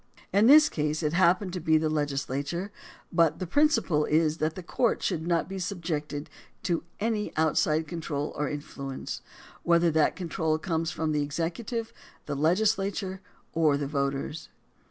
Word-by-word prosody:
In 205 +3 +5
this 300 +3 +9
case 150 +1 -2
it 150 0 0
happened 185 +1 +3
to 180 - -2
be 160 -1 +3
the 155 0 +1
legislature, 145 +4 -2 0.4
but 165 -2 +3
the 185 - -3
principle 225 - +2
is 155 0 +2
that 155 0 -1
the 185 - -7
courts 235 +6 0
should 165 -3 -1
not 170 -1 +1
be 190 0 -5
subjected 160 -5 -3 0.4
to 170 -2 0 0.2
any 215 -1 -1
outside 155 0 +2
control 150 -3 -3
or 150 -1 -1
influence, 140 -2 -6 0.4
whether 170 0 +3
that 155 0 +2
control 160 -3 -1
comes 165 -1 -1
from 160 0 -2
the 150 -1 +1
executive, 170 - -3 0.3
the 145 - -3
legislature, 195 +4 +1 0.3
or 155 -3 +3
the 145 - -2
voters. 140 +2 -2
160 Hz, 155 wpm, -28 LUFS, 150-185 Hz, 0.4 s, this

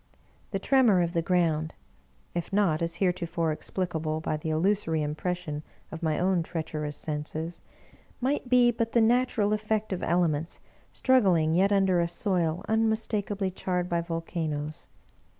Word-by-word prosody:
The 195 - -1
tremor 220 -4 +4
of 170 0 -2
the 170 - +1
ground 165 -3 +1 0.6
(if 175 +2 -3
not, 195 -6 +2
as 170 0 -1
heretofore, 170 -3 0
explicable 160 -1 -2
by 155 - -2
the 155 +1 -4
illusory 160 -1 +1
impression 155 0 -3 0.3
of 160 - -7
my 160 -2 0
own 180 -1 +2
treacherous 155 -3 -4
senses) 155 +2 -4 0.6
might 265 0 -1
be 245 -1 +5
but 230 -1 -2
the 235 - +5
natural 225 -3 +2
effect 215 -1 -1
of 185 - -4
elements 165 -2 0 0.3
struggling 185 -12 +3
yet 190 +4 +3
under 190 -3 +3
a 170 - +1
soil 175 0 -1
unmistakably 215 -3 0
charred 180 -1 -2
by 170 0 +1
volcanoes. 165 -3 -4
175 Hz, 140 wpm, -28 LUFS, 160-205 Hz, 0.6 s, be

